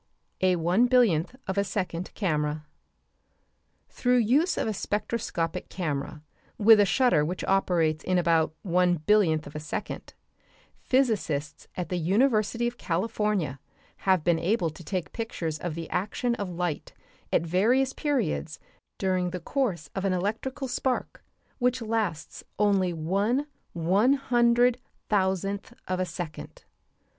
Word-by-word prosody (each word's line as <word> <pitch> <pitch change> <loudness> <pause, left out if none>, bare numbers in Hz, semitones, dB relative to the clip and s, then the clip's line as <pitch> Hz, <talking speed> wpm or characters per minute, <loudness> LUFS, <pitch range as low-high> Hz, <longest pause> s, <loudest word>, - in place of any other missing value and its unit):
A 185 -1 +4
ONE 175 +8 +3
BILLIONTH 235 -6 +3
OF 190 +1 -1
A - - +3
SECOND 185 -3 -3
CAMERA 150 -5 -1 1.2
Through 250 0 +1
use 260 - +3
of - - 0
a 220 - 0
spectroscopic 205 -5 -2
camera 150 -3 -4 0.3
with 220 0 +7
a 205 - +5
shutter 250 - +3
which 175 +4 -3
operates 170 -5 +1
in 185 0 +1
about 165 -2 +2
one 180 -1 +3
billionth 160 -2 +2
of 145 - -11
a - - -3
second, 155 +1 -6 0.6
physicists 205 - 0
at 175 -3 -3
the 180 - -1
University 215 - +2
of 240 0 -6
California 185 - -1 0.4
have 185 -4 +2
been 170 -1 +2
able 175 -1 +1
to 165 - -12
take 180 0 -4
pictures 165 -9 -4
of 175 -3 -4
the 165 -1 -5
action 215 +6 -1
of 205 -5 -4
light 175 -3 -3 0.4
at - - +2
various 240 +10 +2
periods 240 - -1 0.4
during 185 -2 0
the 180 +1 -5
course 180 - -2
of 195 - -3
an 195 -2 +1
electrical 225 +9 -2
spark 255 0 -2 0.4
which 250 0 +2
lasts 215 -8 -3
only 195 -3 +2
one 200 - 0 0.3
one 190 +10 +3
hundred 245 -2 +3 0.3
thousandth 195 +2 0
of 185 0 -1
a 185 - +1
second. 170 -2 -7
190 Hz, 135 wpm, -27 LUFS, 165-230 Hz, 1.2 s, with